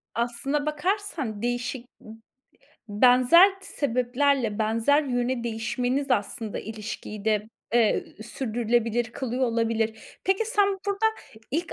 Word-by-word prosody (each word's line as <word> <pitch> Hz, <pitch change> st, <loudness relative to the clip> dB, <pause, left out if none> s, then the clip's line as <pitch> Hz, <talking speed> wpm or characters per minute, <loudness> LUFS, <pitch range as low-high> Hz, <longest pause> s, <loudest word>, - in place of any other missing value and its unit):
Aslına 245 Hz, +5 st, -1 dB
bakarsan 305 Hz, -, -2 dB
değişik, 245 Hz, +1 st, -2 dB, 0.2 s
iii, -, -, -16 dB, 0.8 s
benzer 255 Hz, -, +6 dB
t -, -, -12 dB
sebeplerle, 250 Hz, -3 st, 0 dB
benzer 230 Hz, +7 st, +2 dB
yöne 245 Hz, -2 st, -1 dB
değişmeniz, 250 Hz, +4 st, -1 dB
aslında 215 Hz, -1 st, -1 dB
ilişkiyi 215 Hz, -1 st, -7 dB
de, 215 Hz, 0 st, +1 dB, 0.3 s
eee, 230 Hz, -3 st, +3 dB, 0.2 s
sürdürülebilir 235 Hz, -1 st, 0 dB
kılıyor 260 Hz, -1 st, -3 dB
olabilir. 225 Hz, -1 st, -2 dB
Peki, 385 Hz, +4 st, +2 dB
sen 415 Hz, -3 st, +2 dB, 0.2 s
burada 400 Hz, +2 st, +1 dB, 0.4 s
"İlk 330 Hz, +4 st, -2 dB
245 Hz, 110 wpm, -26 LUFS, 225-285 Hz, 0.8 s, benzer